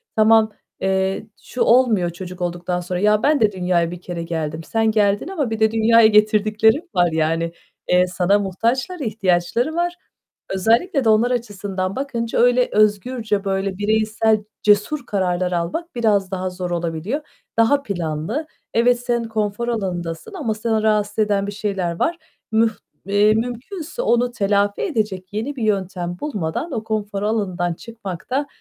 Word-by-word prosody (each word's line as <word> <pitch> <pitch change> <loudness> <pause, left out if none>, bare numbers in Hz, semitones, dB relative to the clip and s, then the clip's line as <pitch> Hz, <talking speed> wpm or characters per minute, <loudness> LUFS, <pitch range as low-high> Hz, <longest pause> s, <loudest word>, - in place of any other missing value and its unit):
tamam, 220 0 +5 0.3
eee, 190 +2 0 0.2
şu 250 - -6
olmuyor 230 -7 +4
çocuk 180 +1 -8
olduktan 175 0 -2
sonra. 180 0 -3
"Ya, 210 +2 +3
ben 295 0 +3
de 215 -2 +3
dünyaya 180 -3 0
bir 175 0 -8
kere 175 -2 -5
geldim." 160 -1 -3
Sen 225 +4 +1
geldin 205 +2 +2
ama 320 -10 -2
bir 225 0 -3
de 220 0 +3
dünyaya 225 0 +5
getirdiklerin 215 - +3
var 175 -1 +3
yani. 165 +1 0 0.4
Eee, 180 0 +4
sana 180 +3 +2
muhtaçlar, 235 - -1
ihtiyaçları 215 - 0
var. 345 +1 0 0.6
Özellikle 235 - +2
de 225 - +3
onlar 225 +3 +4
açısından 195 -5 -3
bakınca 240 -4 -2
öyle 245 +1 +4
özgürce, 215 0 +1
böyle 195 -1 -1
bireysel 215 +1 +1 0.2
cesur 210 +7 +2
kararlar 185 -3 0
almak 180 - -3
biraz 205 -5 +1
daha 185 0 -2
zor 180 -1 -5
olabiliyor. 170 - -2 0.4
Daha 275 +5 +4
planlı. 180 - -3 0.3
Evet, 240 +1 +3
sen 240 -1 -1
konfor 220 0 -2
alanındasın 180 - -3
ama 280 - -2
seni 220 0 -1
rahatsız 210 -1 +1
eden 205 -2 +1
bir - - -3
şeyler 195 -5 -3
var. 340 +1 +1 0.3
Müh 225 0 +3 0.3
eee, 205 +2 +4
mümkünse 255 - -4
onu 245 - +2
telafi 205 -2 +1
edecek 210 - -2
yeni 230 +7 -3
bir 245 - -4
yöntem 185 -4 -1
bulmadan 215 - -3
o 225 -5 -3
konfor 210 -2 -3
alanından 185 -5 -1
çıkmak 200 -3 -8
da, 275 +3 0
210 Hz, 150 wpm, -21 LUFS, 185-230 Hz, 0.6 s, tamam